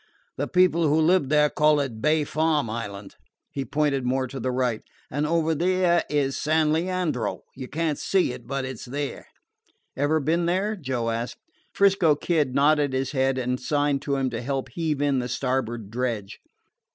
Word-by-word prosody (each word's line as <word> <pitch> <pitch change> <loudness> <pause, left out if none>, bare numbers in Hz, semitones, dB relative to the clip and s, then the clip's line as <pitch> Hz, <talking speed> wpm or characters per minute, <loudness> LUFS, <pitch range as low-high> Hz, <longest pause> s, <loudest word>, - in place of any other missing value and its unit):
The - - -2
people 180 -3 +3
who 150 +2 +3
live 160 -3 +3
there 150 0 +4
call 150 0 +3
it 120 -6 -3
Bay 155 +2 +3
Farm 150 -5 0
Island." 100 -3 -6 0.3
He 140 - -3
pointed 140 0 0
more 130 +1 0
to 135 +1 -7
the 130 - -2
right. 125 -3 0 0.3
"And 145 +3 -1
over 165 0 +1
there 175 +1 +2
is 140 -2 0
San 155 0 +2
Leandro. 170 -6 -1
You 130 -1 -7
can't 155 0 -2
see 185 -10 +1
it, 120 -2 -11
but 135 -1 -2
it 130 -3 -6
's - - -8
there." 140 +3 -5 0.7
"Ever 145 +3 +1
been 165 +4 +1
there?" 195 +5 0
Joe 130 - -2
asked. 115 +2 -4 0.3
'Frisco 195 -6 +4
Kid 150 -4 0
nodded 145 0 +3
his 130 0 -1
head 135 -1 +1
and 125 0 -1
signed 145 0 0
to 140 - -1
him 135 -2 -1
to 115 - -4
help 135 +1 -3
heave 155 -4 -2
in 140 -2 +2
the 125 0 -3
starboard 120 -5 -2
dredge. 115 -5 -3
145 Hz, 180 wpm, -25 LUFS, 130-160 Hz, 0.7 s, there